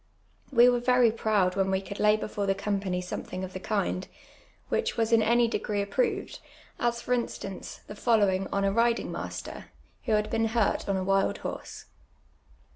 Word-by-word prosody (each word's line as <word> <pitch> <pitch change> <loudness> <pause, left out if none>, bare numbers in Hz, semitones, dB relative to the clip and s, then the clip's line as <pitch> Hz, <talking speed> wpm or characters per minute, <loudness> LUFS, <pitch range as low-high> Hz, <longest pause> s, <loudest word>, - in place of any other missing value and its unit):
We 240 -2 +7
were 245 -1 +4
very 250 -1 +4
]M 225 - -8
oud 195 -4 +3
when 195 -1 +1
we 190 0 +1
could 200 +1 -8
lay 210 0 +4
before 205 -1 -3
the 195 - +2
company 195 -2 -2
somethinpj 185 +1 -5
of 185 0 -6
the 185 - -5
kind, 190 -2 -1 0.6
which - - -1
was 225 0 +1
in 225 - +6
any 235 +2 +3
dei^re 210 -2 -2
approved, 400 - -1 0.4
as, 235 0 0
for 250 - 0
instance, 195 -5 -4
the - - -8
following 205 -4 +2
on 200 - 0
a 195 - +2
ritling 230 +2 +1
mastcr, - - -6 0.4
who 225 - +1
had 210 0 +1
been 225 0 +1
hui 225 -2 +2
t - - -11
on 195 -1 +1
a 185 - -1
wild 195 +1 +1
horse. - - -6
210 Hz, 190 wpm, -28 LUFS, 195-235 Hz, 0.6 s, We